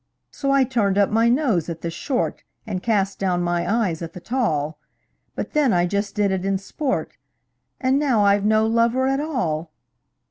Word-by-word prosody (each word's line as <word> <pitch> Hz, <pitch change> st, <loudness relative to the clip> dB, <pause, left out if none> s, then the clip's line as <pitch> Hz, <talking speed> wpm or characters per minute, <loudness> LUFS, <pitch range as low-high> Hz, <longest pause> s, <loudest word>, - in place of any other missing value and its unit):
So 275 Hz, -2 st, -3 dB
I 275 Hz, -1 st, +4 dB
turned 225 Hz, -6 st, 0 dB
up 200 Hz, -1 st, +3 dB
my 225 Hz, +2 st, +3 dB
nose 235 Hz, -, +1 dB
at 165 Hz, -1 st, -6 dB
the 170 Hz, -, -3 dB
short, 255 Hz, -, -2 dB, 0.2 s
And 195 Hz, -5 st, -4 dB
cast 200 Hz, -3 st, 0 dB
down 180 Hz, -2 st, 0 dB
my 175 Hz, +2 st, 0 dB
eyes 205 Hz, -8 st, 0 dB
at 165 Hz, -1 st, -6 dB
the -, -, -8 dB
tall; 160 Hz, -, -1 dB, 0.6 s
But -, -, -5 dB
then 295 Hz, -5 st, +3 dB
I 175 Hz, 0 st, +3 dB
just 200 Hz, +2 st, -2 dB
did 205 Hz, -2 st, +1 dB
it 190 Hz, -1 st, -1 dB
in 195 Hz, 0 st, +1 dB
sport 260 Hz, +8 st, -3 dB, 0.6 s
And 260 Hz, +1 st, +2 dB
now 250 Hz, -8 st, +2 dB
I've 200 Hz, 0 st, +3 dB
no 215 Hz, +1 st, +3 dB
lover 230 Hz, +3 st, +2 dB
at 270 Hz, +1 st, +1 dB
all! 175 Hz, -, -2 dB
205 Hz, 185 wpm, -22 LUFS, 180-255 Hz, 0.6 s, I